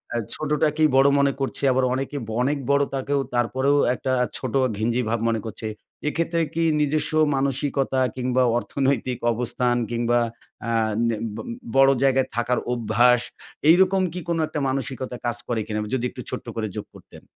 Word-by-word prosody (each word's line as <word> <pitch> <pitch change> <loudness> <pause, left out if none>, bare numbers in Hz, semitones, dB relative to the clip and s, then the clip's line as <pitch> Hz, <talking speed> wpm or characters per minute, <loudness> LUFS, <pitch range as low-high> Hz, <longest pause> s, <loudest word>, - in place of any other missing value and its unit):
আ - - +1 0.2
ছোটটাকেই 155 +1 +1
বড় 135 +1 +6
মনে 140 0 +3
করছে। 135 +1 -3
আবার 130 +1 +2
অনেকে 135 +2 -3 0.2
অনেক 140 +3 +1
বড় 140 0 +4
তাকেও 140 +1 0 0.2
তারপরেও 130 +4 +2 0.2
একটা 130 +1 -3 0.3
ছোট 130 -3 -5 0.2
ঘিঞ্জি 115 +3 0
ভাব 115 - 0
মনে 115 -1 +1
করছে। 110 0 -5 0.4
এক্ষেত্রে 165 +2 0
কি 165 +1 0 0.2
নিজস্ব 150 +1 0 0.2
মানসিকতা, 135 0 0 0.2
কিংবা 130 0 +1
অর্থনৈতিক 130 -1 -1 0.2
অবস্থান 120 +1 0 0.2
কিংবা 120 0 +1 0.5
আ - - -1 0.4
নে 115 - +1 0.2
বম 110 - -7 0.3
বড় 135 0 +6
জায়গায় 135 -1 +3
থাকার 120 +1 +1
অভ্যাস, 120 +1 +3 0.5
এরকম 190 +2 +4
কি 180 - -4
কোন 170 - 0
একটা 150 - -4
মানসিকতা 130 -1 -3
কাজ 120 0 -1
করে 120 -2 -1
কিনা? 110 -1 -2
যদি 125 -2 0
একটু 125 - -9
ছোট্ট - - -5
করে 110 -1 -2
যোগ 105 - -4
করতেন। - - -15
130 Hz, 160 wpm, -23 LUFS, 120-140 Hz, 0.5 s, বড়